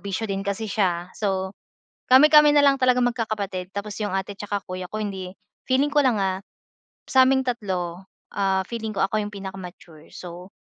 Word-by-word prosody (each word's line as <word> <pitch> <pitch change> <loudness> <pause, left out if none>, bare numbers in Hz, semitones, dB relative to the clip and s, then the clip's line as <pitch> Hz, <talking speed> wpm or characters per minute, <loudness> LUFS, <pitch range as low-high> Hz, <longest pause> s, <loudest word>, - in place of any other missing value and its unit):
bisyo 200 +2 -3
din 195 -2 -2
kasi 200 +2 -3
siya. 185 -4 -1
So, 190 -2 -2 0.6
kami-kami 295 +3 +7
nalang 280 -2 +5
talagang 250 -1 +3
magkakapatid. 200 -6 -4
Tapos 205 +1 -5
yung 205 -3 -2
ate 195 +1 -2
tsaka 205 -1 -3
kuya 185 -1 -6
ko, 215 +2 -4
hindi 190 -2 -6 0.3
feeling 275 +3 +2
ko 295 - +3
lang 255 -5 +3
ah, 190 0 -1 0.7
sa 260 -1 +6
aming 265 0 +3
3 190 -7 -3 0.2
ah, 190 -1 0
feeling 220 -2 -4
ko 195 - 0
ako 215 +2 +1
yung 210 0 -4
pinaka-mature, 180 -5 -10
so, 180 +1 -10
200 Hz, 170 wpm, -24 LUFS, 190-235 Hz, 0.7 s, kami-kami